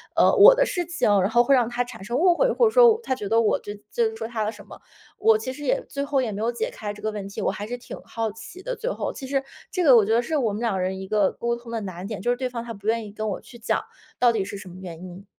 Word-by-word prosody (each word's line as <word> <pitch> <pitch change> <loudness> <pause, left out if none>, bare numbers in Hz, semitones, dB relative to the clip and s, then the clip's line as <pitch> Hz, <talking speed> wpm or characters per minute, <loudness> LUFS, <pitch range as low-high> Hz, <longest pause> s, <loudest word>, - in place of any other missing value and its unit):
呃， - - +5
我 - - +9
的 - - +3
事 355 -7 -2
情， 345 -9 0
然 190 - +1
后 240 +1 +4
会 275 - +3
让 240 -3 +3
她 245 +1 -1
产 230 -5 -10
生 235 +5 -2
误 350 +2 +4
会。 - - -4
或 485 - +3
者 - - 0
说 485 -1 +7
我 445 - 0
她 260 - -1
觉 210 -5 -5
得 225 - +4
我 220 - +2
就 205 - -7 0.2
就 235 - +1
是 220 - -9
说 225 0 -5
她 225 -2 -2
的 215 - -1
什 205 -2 -13
么， - - -12 0.4
我 220 -1 +4
其 255 +4 -5
实 290 - -9
也 - - 0
最 280 - -3
后 280 -2 +1
也 230 -4 -2
没 205 - -5
有 230 +2 +1
解 235 - -3
开 210 -1 -5
这 210 - -13
个 215 +1 -2
问 205 -2 -6
题， 200 - -6
我 - - +1
还 205 - -6
是 245 - -4
挺 245 - -9
好 225 -2 -3
奇 225 - -11
的 - - -3
最 470 +2 -3
后。 - - -3
其 265 - -8
实 275 0 0 0.3
这 365 - 0
个 265 -5 +7
我 215 -3 +6
觉 220 - +1
得 235 - +4
是 305 +5 -2
我 235 -6 +1
们 215 - -4
2 230 -4 0
个 190 - -1
人 190 +1 -2
一 190 - -7
个 205 -2 +2
沟 235 0 -2
通 235 -1 -11
的 225 -1 -2
难 185 -1 -6
点， 215 -4 -5
就 240 - -1
是 245 - 0
对 255 -1 -2
方 235 -2 -5
她 235 -1 -6
不 200 +1 -10
愿 225 -1 +1
意 205 - -9
跟 215 +1 -3
我 195 - -4
去 240 - -14
讲， 225 - 0 0.4
到 245 -1 +5
底 205 -3 0
是 200 0 -6
什 195 -2 -10
么 175 - -12
原 175 -2 -8
因。 185 +2 -10
230 Hz, 360 characters per minute, -24 LUFS, 210-260 Hz, 0.4 s, 我